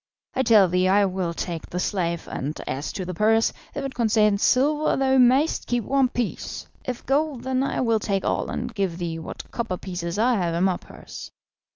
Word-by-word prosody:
I 260 Hz, -, +1 dB
tell 215 Hz, -6 st, +6 dB
thee 180 Hz, +1 st, +2 dB
I 200 Hz, +2 st, +4 dB
will 185 Hz, -2 st, -2 dB
take 170 Hz, -1 st, -5 dB
the 180 Hz, -, -3 dB
slave, 170 Hz, -3 st, -1 dB
and 145 Hz, +4 st, -4 dB
as 140 Hz, +3 st, -3 dB
to 185 Hz, -, -4 dB
the 180 Hz, -, -4 dB
purse, 220 Hz, +5 st, +3 dB, 0.2 s
if -, -, -3 dB
it 270 Hz, -, -4 dB
contains 215 Hz, -3 st, +2 dB
silver 295 Hz, +4 st, +3 dB
thou 265 Hz, 0 st, +3 dB
mayst 260 Hz, +5 st, +3 dB
keep 240 Hz, -1 st, 0 dB
one 270 Hz, +2 st, +2 dB
piece, 245 Hz, -2 st, -4 dB, 0.2 s
if 250 Hz, -2 st, -5 dB
gold 280 Hz, -1 st, 0 dB
then 260 Hz, 0 st, 0 dB
I 275 Hz, -, -1 dB
will 230 Hz, -3 st, +2 dB
take 200 Hz, -2 st, -1 dB
all -, -, 0 dB
and 240 Hz, 0 st, -4 dB
give 195 Hz, -5 st, -1 dB
thee 170 Hz, -2 st, -3 dB
what 160 Hz, -, -9 dB
copper 225 Hz, -6 st, -3 dB
pieces 175 Hz, -1 st, -5 dB
I 235 Hz, +2 st, +3 dB
have 170 Hz, -3 st, -1 dB
in 170 Hz, -, +1 dB
my 190 Hz, -2 st, +2 dB
purse." -, -, -11 dB
210 Hz, 205 wpm, -24 LUFS, 180-255 Hz, 0.2 s, tell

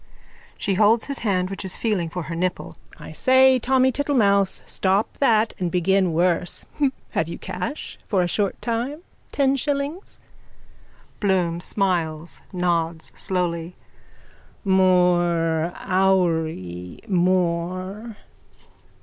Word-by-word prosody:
(She 200 Hz, -, -1 dB
holds 215 Hz, +3 st, +4 dB
his 280 Hz, -1 st, -4 dB
hand 185 Hz, -4 st, 0 dB
which 195 Hz, -, -6 dB
is 190 Hz, -, -2 dB
feeling 200 Hz, -7 st, -1 dB
for 180 Hz, +1 st, -5 dB
her 165 Hz, -, -6 dB
nipple.) 180 Hz, +2 st, -3 dB, 0.2 s
I -, -, -10 dB
say, 260 Hz, 0 st, +4 dB
Tommy 260 Hz, +1 st, +3 dB
Tittlemouse. 205 Hz, -9 st, +1 dB
Stop 195 Hz, +2 st, 0 dB
that 225 Hz, -5 st, +3 dB
and 180 Hz, -2 st, -1 dB
begin 185 Hz, +1 st, +2 dB
worse. 175 Hz, +1 st, 0 dB, 0.5 s
Have 160 Hz, -, 0 dB
you 170 Hz, -, -6 dB
cash 185 Hz, +9 st, -6 dB
for 190 Hz, -4 st, +2 dB
a -, -, 0 dB
short 200 Hz, +2 st, -1 dB
time? 245 Hz, +7 st, -2 dB, 0.3 s
Ten 275 Hz, -1 st, +2 dB
shillings? 285 Hz, +6 st, -3 dB, 1.0 s
BLOOM: 180 Hz, -4 st, +1 dB
(Smiles, 170 Hz, -5 st, -1 dB
nods 170 Hz, -3 st, -1 dB
slowly.) 175 Hz, -2 st, -2 dB, 0.9 s
More, 175 Hz, -3 st, +3 dB
houri, 160 Hz, -, 0 dB
more. 185 Hz, +3 st, -1 dB
185 Hz, 110 wpm, -23 LUFS, 170-220 Hz, 1.0 s, holds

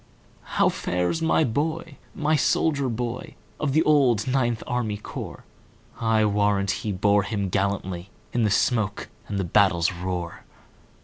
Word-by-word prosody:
"How -, -, +5 dB
fares 90 Hz, -, -1 dB
my 160 Hz, 0 st, +3 dB
boy,—my 155 Hz, +3 st, -2 dB
soldier 145 Hz, -3 st, +1 dB
boy, 120 Hz, +1 st, -4 dB, 0.2 s
Of 140 Hz, -3 st, 0 dB
the 155 Hz, +2 st, +4 dB
old 130 Hz, -8 st, +3 dB
Ninth 125 Hz, -3 st, 0 dB
Army 120 Hz, -4 st, -1 dB
Corps?I 110 Hz, +1 st, -4 dB
warrant 100 Hz, -1 st, +2 dB
he 105 Hz, +2 st, -3 dB
bore 100 Hz, +2 st, +3 dB
him 100 Hz, -2 st, -3 dB
gallantlyIn 95 Hz, -2 st, -1 dB, 0.4 s
the 105 Hz, -, +3 dB
smoke 105 Hz, 0 st, 0 dB, 0.2 s
and 100 Hz, -, -3 dB
the 95 Hz, -, 0 dB
battle's 85 Hz, -2 st, +3 dB
roar!" 90 Hz, -1 st, -4 dB
105 Hz, 125 wpm, -25 LUFS, 100-130 Hz, 0.4 s, How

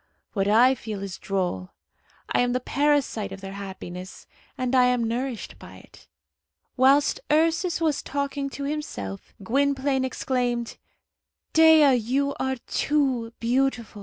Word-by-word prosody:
What 195 Hz, -2 st, 0 dB
I 235 Hz, +5 st, +5 dB
feel 215 Hz, -5 st, -6 dB
is 190 Hz, -1 st, -6 dB
droll. 180 Hz, -, -2 dB, 0.6 s
I -, -, +2 dB
am 245 Hz, 0 st, +2 dB
the 250 Hz, -, +1 dB
parasite 275 Hz, -7 st, 0 dB
of 195 Hz, -, -7 dB
their 195 Hz, 0 st, -8 dB
happiness, 190 Hz, -2 st, -8 dB, 0.3 s
and 255 Hz, -1 st, -2 dB
I 255 Hz, -1 st, +5 dB
am 250 Hz, -1 st, +2 dB
nourished 240 Hz, +1 st, -4 dB
by 95 Hz, -, -12 dB
it." -, -, -18 dB, 0.7 s
Whilst 275 Hz, +3 st, +4 dB
Ursus 330 Hz, +3 st, +2 dB
was 315 Hz, -4 st, 0 dB
talking 280 Hz, 0 st, -3 dB
to 280 Hz, -, -7 dB
himself, 275 Hz, -, -5 dB
Gwynplaine 275 Hz, +3 st, +1 dB
exclaimed, 245 Hz, -2 st, -2 dB, 0.8 s
"Dea, 320 Hz, -3 st, +7 dB
you 260 Hz, +4 st, 0 dB
are 265 Hz, 0 st, 0 dB
too 265 Hz, -6 st, 0 dB
beautiful! 240 Hz, -3 st, 0 dB
255 Hz, 135 wpm, -25 LUFS, 215-280 Hz, 0.8 s, Dea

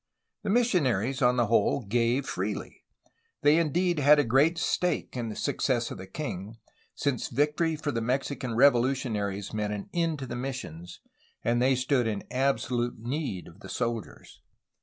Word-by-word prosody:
The -, -, -4 dB
missionaries, 135 Hz, -, +2 dB
on 125 Hz, -1 st, +4 dB
the 120 Hz, -, +3 dB
whole, 115 Hz, +2 st, +2 dB
gave 120 Hz, +5 st, +1 dB
freely. -, -, -4 dB, 0.6 s
They 150 Hz, +3 st, +6 dB
indeed 170 Hz, +1 st, +1 dB
had 145 Hz, +1 st, +6 dB
a 145 Hz, -, +4 dB
great 140 Hz, +8 st, +3 dB
stake 180 Hz, -2 st, -1 dB
in 120 Hz, -2 st, -3 dB
the 105 Hz, -, -6 dB
success 120 Hz, -4 st, 0 dB
of -, -, -7 dB
the 95 Hz, -, -8 dB
king, 105 Hz, -3 st, -6 dB, 0.4 s
since 140 Hz, -4 st, -1 dB
victory 150 Hz, +5 st, +1 dB
for 150 Hz, -1 st, -3 dB
the 115 Hz, -, -2 dB
Mexican 130 Hz, 0 st, -2 dB
revolutionaries 120 Hz, -6 st, +2 dB
meant 105 Hz, -1 st, -1 dB
an 100 Hz, -1 st, -7 dB
end 165 Hz, -2 st, 0 dB
to 135 Hz, -, -5 dB
the 120 Hz, -, -5 dB
missions, 120 Hz, -, -6 dB, 0.4 s
and 120 Hz, +1 st, +1 dB
they 130 Hz, +1 st, +4 dB
stood 130 Hz, -1 st, +1 dB
in 105 Hz, -2 st, -2 dB
absolute 125 Hz, -2 st, 0 dB
need 120 Hz, -, -4 dB
of 85 Hz, +3 st, -15 dB
the -, -, -11 dB
soldiers. 120 Hz, -3 st, -4 dB
125 Hz, 160 wpm, -28 LUFS, 115-145 Hz, 0.6 s, They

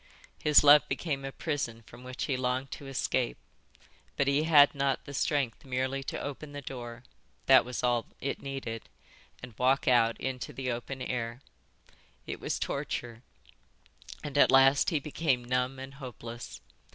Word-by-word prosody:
His 150 Hz, -1 st, +6 dB
love 145 Hz, 0 st, +9 dB
became 140 Hz, -5 st, -2 dB
a 135 Hz, -, -4 dB
prison 135 Hz, -7 st, -3 dB
from 125 Hz, -, -14 dB
which 130 Hz, +1 st, -5 dB
he 140 Hz, -, 0 dB
longed 130 Hz, +1 st, -1 dB
to 140 Hz, -, -8 dB
escape, 130 Hz, -, -1 dB, 0.8 s
but 140 Hz, -, +2 dB
he 140 Hz, +3 st, +2 dB
had 145 Hz, -3 st, +7 dB
not 140 Hz, -2 st, -1 dB
the 140 Hz, -, -8 dB
strength 140 Hz, -4 st, -1 dB
merely 130 Hz, +1 st, -2 dB
to -, -, -4 dB
open 145 Hz, +1 st, -6 dB
the 145 Hz, -, -6 dB
door—that 125 Hz, +1 st, 0 dB
was 125 Hz, +1 st, -5 dB
all 120 Hz, -2 st, +1 dB
it 140 Hz, -, -3 dB
needed—and 125 Hz, -2 st, -9 dB
walk 130 Hz, +2 st, +2 dB
out 115 Hz, -2 st, +4 dB
into 130 Hz, -1 st, -4 dB
the 130 Hz, -2 st, -3 dB
open 130 Hz, +2 st, -5 dB
air. 120 Hz, -1 st, -3 dB, 0.9 s
It -, -, -5 dB
was -, -, -2 dB
torture 115 Hz, -1 st, -4 dB, 1.0 s
and 145 Hz, -1 st, -2 dB
at -, -, +7 dB
last 135 Hz, +1 st, +6 dB
he 160 Hz, -5 st, 0 dB
became 140 Hz, -4 st, -1 dB
numb 125 Hz, +1 st, 0 dB
and 135 Hz, +1 st, -8 dB
hopeless. 120 Hz, -3 st, -9 dB
130 Hz, 150 wpm, -30 LUFS, 125-140 Hz, 1.0 s, love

